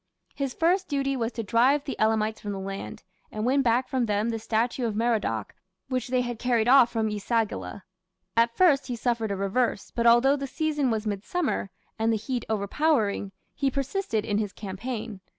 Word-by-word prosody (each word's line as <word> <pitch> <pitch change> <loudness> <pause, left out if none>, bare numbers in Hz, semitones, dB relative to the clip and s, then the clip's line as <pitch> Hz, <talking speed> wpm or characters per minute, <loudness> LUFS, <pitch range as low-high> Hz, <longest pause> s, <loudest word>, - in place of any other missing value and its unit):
His 275 -3 -3
first 365 +3 +2
duty 275 -2 0
was 235 -2 -1
to 230 - -3
drive 250 +7 +3
the 285 - -4
Elamites 220 0 +1
from 205 -1 -4
the 195 - -5
land, 195 +1 -6 0.3
and 215 +1 -3
win 270 +3 +3
back 250 0 +2
from 255 -4 0
them 210 +2 0
the 225 -1 -2
statue 230 +3 0
of 215 - -3
Merodach 215 - 0 0.4
which 255 -1 -1
they 255 0 +1
had 240 -2 -4
carried 240 -2 +1
off 255 -2 +7
from 225 -2 0
E 210 -1 -3
sagila. 220 -2 -2 0.5
At 230 0 +2
first 300 -8 +4
he 245 - -3
suffered 235 -2 -1
a 200 - -1
reverse, 200 +3 -1
but 235 0 +1
although 240 +4 +6
the 275 -1 -4
season 300 -1 0
was 220 -1 -1
midsummer, 210 - -2 0.3
and 225 +1 +2
the 225 - +1
heat 240 +2 -3
overpowering, 215 -1 0 0.2
he 275 -1 0
persisted 275 - -2
in 205 0 0
his 205 -3 -3
campaign. 215 +2 -6
235 Hz, 190 wpm, -26 LUFS, 215-265 Hz, 0.5 s, off